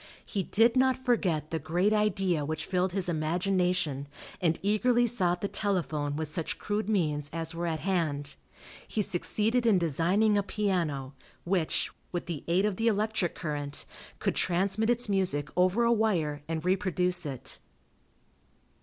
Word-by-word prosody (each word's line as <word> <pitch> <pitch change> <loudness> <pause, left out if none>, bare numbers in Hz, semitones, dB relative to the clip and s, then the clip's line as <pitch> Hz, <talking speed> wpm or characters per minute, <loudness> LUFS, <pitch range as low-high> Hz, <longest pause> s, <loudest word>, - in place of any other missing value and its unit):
He 200 - -2
did 225 +6 +3
not 260 0 +3
forget 190 - 0
the 160 - -1
great 180 +8 +1
idea 195 -6 +1
which 155 +1 -3
filled 185 0 0
his 190 0 -1
imagination 175 -2 0 0.3
and 165 -2 +2
eagerly 240 +4 +3
sought 180 -7 +1
the 200 - 0
telephone 160 -9 -1
with 160 +1 -2
such 160 +1 -3
crude 210 0 -2
means 150 -8 0
as 165 0 -3
were 170 +1 -3
at 160 -2 -2
hand. 155 -6 -1 0.5
He 215 - 0
succeeded 220 +6 +1
in 210 -4 +5
designing 180 +6 +2
a - - +2
piano 175 -10 -1 0.3
which, 175 -3 0 0.2
with 175 - -3
the 165 -5 -5
aid 180 +4 +2
of 205 -3 -1
the 225 - 0
electric 215 -4 0
current, 145 -3 -3 0.3
could - - -1
transmit 195 +5 +1
its 240 0 +1
music 180 -8 0
over 185 +6 +3
a 235 - +3
wire 170 -10 0
and 160 0 -3
reproduce 180 -2 +2
it. 135 -3 -7
180 Hz, 155 wpm, -29 LUFS, 160-210 Hz, 0.5 s, in